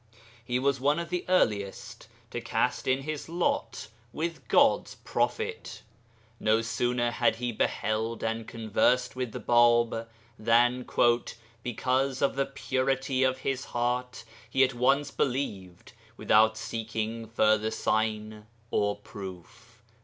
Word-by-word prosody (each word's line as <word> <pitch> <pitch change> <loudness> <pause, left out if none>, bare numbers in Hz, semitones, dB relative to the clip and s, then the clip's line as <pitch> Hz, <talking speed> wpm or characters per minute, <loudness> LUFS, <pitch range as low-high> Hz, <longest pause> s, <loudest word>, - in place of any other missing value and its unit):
He 120 +1 -1
was 135 +1 +1
one 145 +3 +3
of 170 -1 -4
the 180 -1 -1
earliest 105 - 0 0.2
to - - -4
cast - - -1
in 130 +1 +1
his 155 +1 -5
lot 145 -10 -1 0.2
with 160 -6 -4
God's - - +3
prophet. - - -3 0.6
No 110 +1 +2
sooner 120 +1 0
had 110 - +2
he 120 +1 -3
beheld 110 +1 -1
and 115 0 -2
conversed 115 +3 +1
with 125 -2 -3
the - - -6
Bāb, 120 -1 +3 0.3
than, 120 +3 +3 0.7
'because 130 +3 -1
of 140 - +2
the 135 0 0
purity 135 0 -1
of 130 0 +2
his 135 -1 -1
heart, 125 0 -2 0.3
he 135 - +4
at 130 0 +2
once 135 +4 +2
believed 100 -10 -3 0.2
without 110 +1 +4
seeking 115 0 -4
further 110 -1 +2
sign 110 -1 -1 0.2
or 105 0 +1
proof.' 95 -4 -11
120 Hz, 125 wpm, -28 LUFS, 110-130 Hz, 0.7 s, he